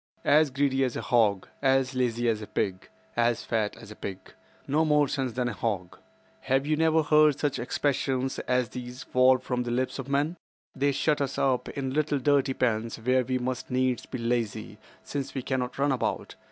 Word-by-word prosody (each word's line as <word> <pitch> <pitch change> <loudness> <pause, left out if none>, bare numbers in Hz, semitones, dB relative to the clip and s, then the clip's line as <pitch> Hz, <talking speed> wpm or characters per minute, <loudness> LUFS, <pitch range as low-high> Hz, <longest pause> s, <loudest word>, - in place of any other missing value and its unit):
"'As 155 0 +5
greedy 135 0 +1
as 125 -2 -1
a - - -2
hog.' 105 -6 +2
'As 135 -1 +2
lazy 120 -2 0
as 110 -2 +1
a 105 - -7
pig.' 95 -1 -2 0.3
'As 120 0 +1
fat 110 -3 -1
as 110 -2 -12
a - - -9
pig.' 95 -2 -8 0.3
'No 150 +3 +2
more 150 -2 +3
sense 130 -3 -2
than 125 +1 -1
a 120 - -2
hog.' 95 -6 -3 0.4
Have 135 +1 0
you 155 +1 +1
never 160 0 +3
heard 150 -1 +5
such 145 -2 -1
expressions 130 +1 -1
as 125 -2 +1
these 125 0 -7
fall 130 0 +4
from 125 -1 -3
the 120 - -3
lips 130 +3 -1
of 135 0 -6
men? 145 +5 0 0.4
They 140 +1 +2
shut 145 +1 +1
us 135 -1 -2
up 130 -2 +1
in 135 -2 -4
little 150 0 +1
dirty 140 0 +2
pens 115 -2 0
where 125 +3 +2
we 130 +1 -1
must 125 0 -3
needs 130 -1 0
be - - -5
lazy, 115 -3 -2 0.2
since 140 -1 -5
we 130 - -3
cannot 130 -1 -2
run 140 +1 +2
about. 130 - -2
130 Hz, 195 wpm, -27 LUFS, 120-140 Hz, 0.4 s, As